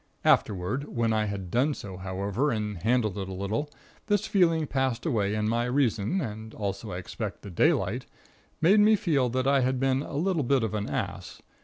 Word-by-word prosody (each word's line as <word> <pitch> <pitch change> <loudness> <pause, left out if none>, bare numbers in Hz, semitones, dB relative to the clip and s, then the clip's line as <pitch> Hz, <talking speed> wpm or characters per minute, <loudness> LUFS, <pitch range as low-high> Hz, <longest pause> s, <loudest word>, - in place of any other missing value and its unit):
Afterward, 105 +8 +2
when 115 -5 0
I 110 -1 +1
had 100 -4 -5
done 135 +4 +2
so, 95 -2 -8
however, 100 +8 -1
and 105 -6 -2
handled 110 -3 +1
it 95 -1 -4
a - - -5
little, 105 +10 -2 0.4
this 205 -2 +2
feeling 165 -5 +3
passed 130 -3 -1
away 105 -9 +1
and 105 0 0
my 115 +2 +1
Reason 125 - +1
(and 110 - -6
also, 100 +1 -4
I 90 - -4
expect, 100 +3 -6
the 100 - -8
daylight) 85 - +1 0.5
made 190 +7 +6
me 215 +1 +6
feel 150 -11 +1
that 130 +2 -1
I 140 0 +4
had 130 0 +1
been 135 0 +2
a 145 - -7
little 170 +2 +1
bit 135 -1 +2
of 110 - -2
an 105 -1 -2
ass. - - -4
115 Hz, 195 wpm, -27 LUFS, 100-140 Hz, 0.5 s, made